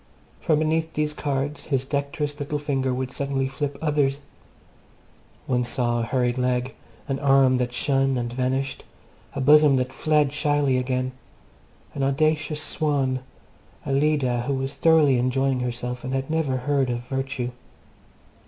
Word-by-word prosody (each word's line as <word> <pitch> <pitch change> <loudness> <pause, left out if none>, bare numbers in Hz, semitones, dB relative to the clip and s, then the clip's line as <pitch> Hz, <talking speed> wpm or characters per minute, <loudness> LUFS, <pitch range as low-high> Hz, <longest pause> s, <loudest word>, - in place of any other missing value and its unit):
From 155 -4 +2
beneath 160 +1 0
these 150 0 0
cards 145 0 -3
his 135 -3 -1
dexterous 145 +1 -3
little 145 +1 -2
finger 135 -3 -1
would 130 0 -3
suddenly 135 0 -1
flip 140 +1 -4
others. 145 -3 +1 1.3
One 125 -1 +1
saw 120 0 0
a 115 - -1
hurried 125 +1 0
leg, 125 0 0 0.3
an 135 -1 -2
arm 135 -2 +4
that 125 -1 -1
shone 135 +1 +1
and 120 -1 -3
vanished, 130 +2 -1 0.5
a 140 - -2
bosom 150 0 +6
that 130 0 -1
fled 150 -1 +2
shyly 145 -3 +1
again, 130 0 -1 0.8
an 140 - -4
audacious 150 +2 +1
swan, 140 -5 0 0.7
a - - -2
Leda 135 -4 +2
who 140 - +1
was 135 +1 -3
thoroughly 145 -3 +4
enjoying 130 +1 +1
herself 125 0 -4
and 130 +1 -3
had 135 +3 -2
never 155 -5 0
heard 135 0 0
of 120 -1 -2
virtue. 135 -2 -3
135 Hz, 145 wpm, -24 LUFS, 130-145 Hz, 1.3 s, bosom